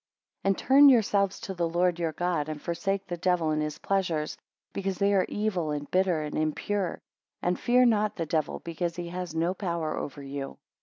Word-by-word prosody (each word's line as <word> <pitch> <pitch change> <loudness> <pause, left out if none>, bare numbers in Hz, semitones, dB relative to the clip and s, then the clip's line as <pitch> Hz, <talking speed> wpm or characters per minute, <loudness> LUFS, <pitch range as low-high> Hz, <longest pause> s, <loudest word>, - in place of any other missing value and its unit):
22 - - -3
And 195 - +2
turn 280 +2 +7
yourselves 200 -5 +3
to 190 - -5
the 170 -2 -1
Lord 175 +1 +1
your 165 -2 0
God, 170 -4 -1
and 155 -1 -4
forsake 190 +5 -2
the 175 - -5
devil 175 -2 +1
and 155 0 0
his 150 -1 -3
pleasures, 170 -6 -1 0.4
because 195 -1 -2
they 200 0 +2
are 190 -2 +3
evil, 200 -7 -1
and 145 -1 -4
bitter, 180 -4 +2
and 150 - -5
impure. 175 +5 -1 0.4
And 180 0 0
fear 250 +1 +4
not 215 -3 +2
the 165 - -2
devil, 155 -1 -1
because 170 0 -3
he 175 -1 -5
has 180 -2 -5
no 170 +3 +1
power 170 -5 -2
over 140 0 -5
you. 135 0 -6
175 Hz, 200 wpm, -28 LUFS, 155-195 Hz, 0.4 s, turn